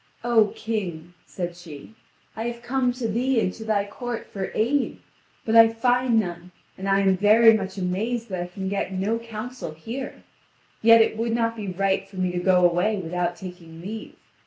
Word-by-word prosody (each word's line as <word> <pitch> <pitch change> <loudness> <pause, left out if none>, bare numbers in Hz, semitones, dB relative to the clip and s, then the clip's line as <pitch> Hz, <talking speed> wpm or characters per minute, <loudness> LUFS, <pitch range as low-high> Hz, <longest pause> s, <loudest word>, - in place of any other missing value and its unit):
"O 235 -3 +4
King," 175 -7 -4
said 175 -2 -5
she, 170 +1 -11 0.4
"I 225 - -4
have 235 0 -6
come 255 0 +1
to 245 -2 -3
thee 245 +3 +1
and 185 - 0
to 225 - -9
thy 210 -2 +1
court 240 +3 -5
for 195 -2 -4
aid. 260 +6 +1 0.5
But 225 - +1
I 225 0 +9
find 245 +1 +2
none, 175 -3 -4 0.3
and 195 +1 -4
I 195 0 +4
am 190 -1 +3
very 220 +4 +6
much 195 -3 -2
mazed 215 +6 -2
that 185 -2 -3
I 175 - -4
can 190 +2 -6
get 195 0 -2
no 200 +5 -1
counsel 230 -5 -7
here. 235 - -7 0.6
Yet 230 0 +7
it 220 - -3
would 230 0 -1
not 230 -1 0
be 210 -3 -6
right 195 +1 0
for 195 - -15
me 185 -1 0
to 180 - -2
go 180 -1 +5
away 180 +5 +1
without 175 -1 -2
taking 175 -3 -10
leave. 210 +5 -7
205 Hz, 190 wpm, -24 LUFS, 180-230 Hz, 0.6 s, I